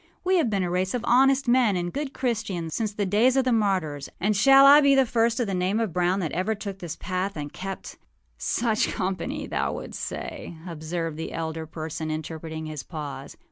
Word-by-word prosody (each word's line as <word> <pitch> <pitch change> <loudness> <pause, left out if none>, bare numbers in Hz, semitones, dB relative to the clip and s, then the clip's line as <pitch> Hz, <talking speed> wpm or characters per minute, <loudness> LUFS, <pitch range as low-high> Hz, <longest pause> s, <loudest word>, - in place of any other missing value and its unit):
We 370 +1 +3
have 305 -9 +2
been 200 -3 0
a 175 - -1
race 185 +4 0
of 240 -1 -3
honest 270 +2 +4
men 240 -4 +4
and 175 -1 -2
good 285 -1 -3
Christians 220 - -2
since 220 -3 -1
the 205 -1 -2
days 225 +7 +3
of 265 - +4
the 255 - +1
martyrs; 185 - 0
and 210 +3 +1
shall 270 +7 +7
I 285 +2 +9
be 280 -1 +5
the 270 -1 +5
first 230 0 +1
of 240 - +1
the 200 - -3
name 185 +4 0
of 220 -7 -1
Brown 180 +2 +1
that 165 - -2
ever 190 +5 -1
took 200 -2 -6
this 170 -4 -5
path 185 0 -3
and 145 -1 -6
keptââ 195 +1 -7 0.4
âSuch 225 -3 +1
company, 255 +11 -3
thou - - -1
wouldst - - -7
say,â 165 +1 -6
observed 165 0 -4
the 160 - -5
elder 160 -1 -4
person, 160 0 -5
interpreting 160 0 -5
his 155 -2 -5
pause. 140 -4 -7
190 Hz, 210 wpm, -25 LUFS, 165-235 Hz, 0.4 s, I